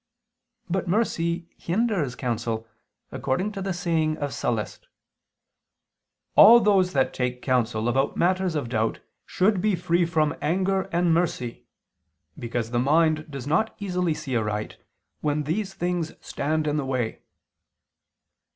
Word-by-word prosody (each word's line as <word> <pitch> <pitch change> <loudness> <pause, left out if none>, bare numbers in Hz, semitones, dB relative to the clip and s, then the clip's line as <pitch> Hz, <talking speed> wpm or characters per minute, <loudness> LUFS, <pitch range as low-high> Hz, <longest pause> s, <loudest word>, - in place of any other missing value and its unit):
But 185 +1 -2
mercy 170 -4 0
hinders 180 - 0
counsel, 115 -3 -3 0.4
according 185 +11 -1
to 200 -2 -6
the 195 0 -2
saying 165 -4 0
of 145 -2 -3
Sallust 110 -5 -2
(Catilin.): - - -39 1.5
"All 235 +2 +10
those 195 -4 +3
that 135 -2 +1
take 125 -1 -2
counsel 120 -3 +1
about 135 +3 +1
matters 185 -1 +1
of 145 -5 -1
doubt, 110 -2 0 0.3
should 190 0 +2
be 210 -1 +2
free 170 0 +1
from... 155 -3 +1
anger... 190 +4 0
and 170 0 +2
mercy, 155 -8 -2 0.7
because 115 -1 -3
the 120 - +1
mind 155 +3 +2
does 135 -4 -7
not 165 +10 +1
easily 180 -5 -1
see 130 -4 -4
aright, 105 -1 -2 0.4
when 150 0 0
these 195 +6 -2
things 175 -3 -2
stand 155 +2 -2
in 150 0 0
the 145 - -1
way." 125 -4 -2
160 Hz, 135 wpm, -25 LUFS, 125-180 Hz, 1.5 s, All